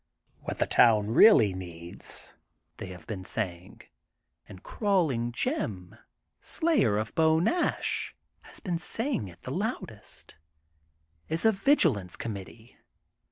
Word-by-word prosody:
What - - -6
the - - +1
town 110 -2 +4
really 115 - +6
needs," 85 -2 -4 0.4
they - - -7
have 90 -1 -11
been 100 -5 -6
saying, 95 -3 -5 0.3
— - - -39
and 95 - -12
Crawling 160 - 0
Jim, 115 - -3 0.5
slayer 300 - +1
of 110 0 -3
Beau 160 0 +3
Nash, 335 - 0 0.3
has - - -14
been 175 -4 -3
saying 225 - -2
it 85 - -15
the - - -6
loudest, - - -5 0.4
— 75 +1 -43
is 160 +6 -1
a 220 - +7
vigilance 170 - +2
committee. 110 +2 -8
110 Hz, 125 wpm, -28 LUFS, -, 0.5 s, a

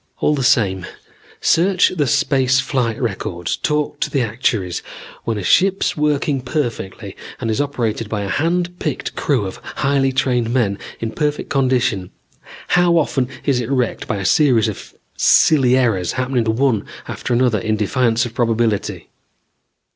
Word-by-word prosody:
"All 150 - +2
the 145 - -1
same, 95 -7 +2 0.5
search 180 +2 +3
the 150 -6 -1
space 130 +1 +2
flight 130 -5 -1
records, 95 -7 -3
talk 150 -1 -1
to - - -1
the 135 -4 0
actuaries. 110 -5 -1 0.4
When 115 -2 -1
a 100 - -4
ship 190 - +3
is - - 0
working 150 -2 0
perfectly 125 -7 -4 0.2
and 115 - -2
is 110 - 0
operated 115 -6 -2
by 105 -2 -2
a - - -4
hand 175 - -1
picked 150 -6 -3
crew 130 -8 0
of 95 - -6
highly 135 -1 0
trained 125 -3 0
men 105 -6 0 0.2
in 115 -1 -2
perfect 150 +3 -2
condition, 125 - +1 0.6
how 175 -1 +4
often 135 -5 +1 0.2
is 135 -4 +2
it 120 - -5
wrecked 125 -4 -1
by 105 - -1
a 95 - -4
series 125 -6 +4
of 105 - -7 0.2
silly 130 -5 +4
errors 110 -9 +1
happening 130 -2 0
one 115 0 +1 0.2
after - - -5
another 120 -3 +2
in 110 +2 -1
defiance 115 +2 +1
of 120 - -7
probability? 115 -3 -1
125 Hz, 155 wpm, -19 LUFS, 110-140 Hz, 0.6 s, how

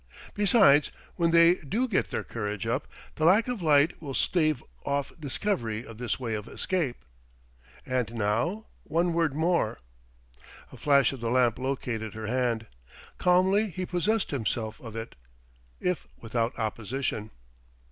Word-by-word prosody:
Besides, 195 -8 +5 0.2
when 170 -2 +2
they 170 +2 +6
do 215 - -1
get 220 - 0
their - - -2
courage 105 -1 -4
up, 120 +5 -1 0.3
the 155 - -2
lack 200 +8 +5
of 245 -5 -3
light 150 -1 +3
will 140 -4 -5
stave 155 -4 +1 0.2
off 140 0 -1
discovery 125 - -2
of 115 -1 -11
this 125 -1 -2
way 120 -3 -3
of 105 +1 -4
escape.... 175 -10 -2 0.9
And 125 -3 -1
now, 115 - 0 0.2
one 170 +1 +1
word 165 -4 +1
more." 160 -8 +1 0.9
A - - -11
flash 140 -2 +4
of 135 - -7
the 115 0 -2
lamp 120 -1 +3
located 125 -5 -3
her 110 0 -5
hand. 120 -1 0 0.5
Calmly 190 +4 +3
he 185 +1 -4
possessed 195 +5 0
himself 115 -4 -2
of 115 -3 -9
it, 115 +1 -6 0.7
if 180 -4 -1
without 115 +1 -2
opposition. 110 0 -3
140 Hz, 145 wpm, -28 LUFS, 115-175 Hz, 0.9 s, they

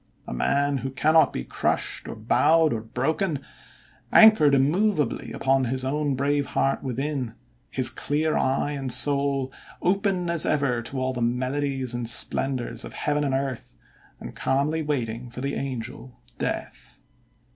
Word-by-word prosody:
A - - -5
man, 140 - +1
who 135 - -4
cannot 155 +4 +3
be - - -4
crushed, - - -2
or - - -6
bowed, 155 +8 +3
or 110 - -3
broken; 160 - -1 0.7
anchored 215 -11 +7
immovably 155 +5 +1
upon 135 0 +1
his 130 +2 -2
own 145 0 -1
brave 140 +1 0
heart 135 0 0
within; 130 -2 -3 0.3
his 130 -2 +4
clear 155 +2 -1
eye 135 +2 0
and 135 -3 -4
soul 140 0 +1 0.3
open 190 -1 0
as 170 -2 +2
ever 135 -5 +1
to 130 +3 -5
all 130 0 -1
the 125 - -4
melodies 130 +2 0
and 120 -1 -1
splendors 130 +1 0
of - - -8
heaven 150 0 -1
and 135 -2 0
earth, 135 -3 -4 0.4
and - - -9
calmly 145 +4 0
waiting 125 -5 -3
for 125 +1 -8
the 140 +1 -2
angel, 125 -1 -6 0.2
Death." - - -5
135 Hz, 145 wpm, -25 LUFS, 130-150 Hz, 0.7 s, anchored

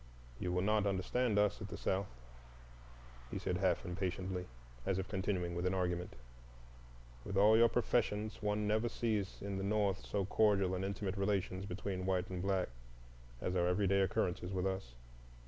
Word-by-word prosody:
"You 90 - -1
will 90 +1 +1
not 105 0 +2
understand 105 +4 +1
us 105 0 +2
at 100 - -4
the - - -6
South," 95 +1 0 1.2
he - - -4
said 90 - -1
half 95 -2 +1
impatiently, 90 0 -3 0.4
as 95 - 0
if 95 +1 -2
continuing 95 -3 -1
an 90 +1 +1
argument. 90 -1 -1 1.1
"With 100 - -3
all 105 +2 +7
your 115 +1 +6
professions, 110 -3 0
one 105 0 0
never 110 +3 +2
sees 105 -6 -1
in 100 -1 -3
the - - -3
North 100 -1 +1
so 100 -2 -1
cordial 100 -2 +3
and 95 +1 -1
intimate 100 0 -2
relations 95 -1 0
between 95 0 -3
white 95 -1 0
and 90 -1 -3
black 95 -3 +1 0.7
as 90 - -1
are 90 -1 +3
everyday 100 +1 +3
occurrences 90 -1 0
with 95 -1 -1
us. 95 -11 -3
95 Hz, 165 wpm, -36 LUFS, 90-105 Hz, 1.2 s, all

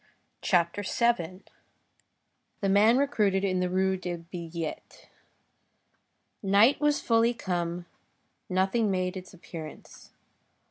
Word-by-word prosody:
CHAPTER 175 +2 +1
VII—THE 195 -1 -4
MAN 210 +5 +5
RECRUITED 210 -9 +1
IN 185 -2 +1
THE 180 0 0
RUE 190 +1 +1
DES 175 -2 -5
BILLETTES 170 -2 -6 1.4
Night 205 +8 +4
was 295 0 +2
fully 230 +1 +2
come, 175 -4 -3 0.6
nothing 195 +4 +1
made 185 -1 -1
its 185 -1 -8
appearance. 165 -3 -11
190 Hz, 95 wpm, -28 LUFS, 180-215 Hz, 1.4 s, MAN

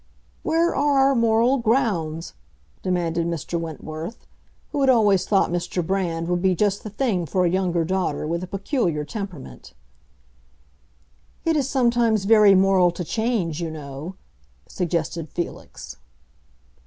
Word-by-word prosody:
"Where 330 +2 +1
are 285 0 +2
our - - +3
moral 230 +2 +3
grounds?" 200 - 0 0.5
demanded 170 -2 -1
Mr. 170 0 -3
Wentworth, 160 +4 -7 0.5
who 285 - -1
had 270 - +3
always 210 -6 +4
thought 195 -4 +2
Mr. 175 0 -2
Brand 170 -3 -1
would 175 0 0
be 190 -1 +2
just 205 +2 0
the 215 - -7
thing 205 -6 -1
for 180 +5 +1
a - - +3
younger 175 -3 0
daughter 185 -5 -1
with 170 +3 -2
a - - -5
peculiar 190 - -1
temperament. 170 - -8 1.7
"It 325 -1 +2
is 280 -3 0
sometimes 235 -5 +2
very 210 -2 +6
moral 190 -1 +4
to 175 +1 -5
change, 195 -5 -1
you 165 - -2
know," 150 +3 -7 0.5
suggested 165 -2 -3
Felix. 135 - -7
185 Hz, 135 wpm, -23 LUFS, 165-225 Hz, 1.7 s, very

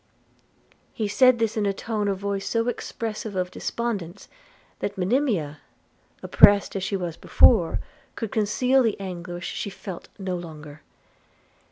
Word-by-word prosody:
He 215 - -2
said 255 +4 +5
this 225 -2 0
in 210 -2 0
a 200 - +1
tone 210 0 -2
of 195 -1 0
voice 200 0 -3
so 230 0 0
expressive 220 -3 -4
of 180 -1 -1
despondence, 205 -5 -4 0.5
that 205 - -4
Monimia, 190 - 0 0.6
oppressed 205 0 +5
as 195 - -2
she 195 +1 -1
was 175 -3 -4
before, 180 -9 +4 0.4
could 225 - -4
conceal 250 +5 +2
the 225 -5 0
anguish 175 -2 -6
she - - -4
felt 190 -2 -8
no 190 -2 -3
longer. 155 -4 -9
200 Hz, 140 wpm, -25 LUFS, 180-225 Hz, 0.6 s, said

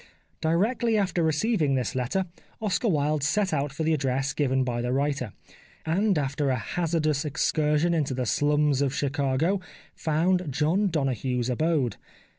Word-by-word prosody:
Directly 215 +8 +1
after 190 -4 0
receiving 160 - +1
this 125 -7 -1
letter 130 +10 -1 0.3
Oscar 215 +2 0
Wilde 150 -4 +1
set 170 +7 +1
out 145 -1 0
for 145 +4 -4
the 160 +1 +2
address 135 -2 0
given 130 -2 +1
by 120 -2 -2
the 125 +1 -2
writer, 140 -4 -1 0.5
and 190 +4 +2
after 140 0 -1
a 130 - +2
hazardous 155 +3 -1
excursion 150 +2 +1
into 145 -5 0
the 125 -1 -1
slums 145 +1 +2
of 140 -1 0
Chicago 145 +6 0 0.3
found 175 +3 +1
John 160 +9 +1
Donoghue's 130 - -1
abode. 140 -4 0
150 Hz, 145 wpm, -26 LUFS, 135-170 Hz, 0.5 s, the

